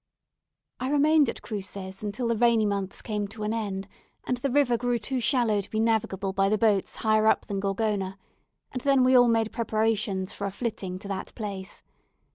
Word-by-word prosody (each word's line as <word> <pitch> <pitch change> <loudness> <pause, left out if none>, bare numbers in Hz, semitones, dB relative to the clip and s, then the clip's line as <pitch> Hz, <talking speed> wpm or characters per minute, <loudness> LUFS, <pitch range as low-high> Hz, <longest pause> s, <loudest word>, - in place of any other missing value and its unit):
I 255 +1 -2
remained 295 -1 +4
at - - -6
Cruces 195 -2 -5
until 215 +4 -3
the 230 - +2
rainy 230 -1 +3
months 200 -2 -3
came 210 -2 -2
to 215 +1 -8
an 210 +1 -1
end, 200 -4 -3 0.4
and 250 - -1
the 275 +3 -2
river 265 -2 +3
grew 245 +1 0
too 250 +3 -2
shallow 230 -5 +2
to 195 - -11
be 215 - -2
navigable 205 -4 0
by 195 0 +2
the 215 - +2
boats 210 -3 +1
higher 215 0 +2
up - - +3
than 200 -1 -3
Gorgona; 195 -1 -1 0.5
and 255 - -4
then 275 -1 +4
we 255 +1 +5
all 245 -1 +7
made 225 -1 +2
preparations 215 -4 -1
for 200 - -3
a - - -4
flitting 195 -4 -4
to 195 - -10
that 190 -1 -5
place. 200 -3 -6
215 Hz, 195 wpm, -27 LUFS, 195-240 Hz, 0.5 s, all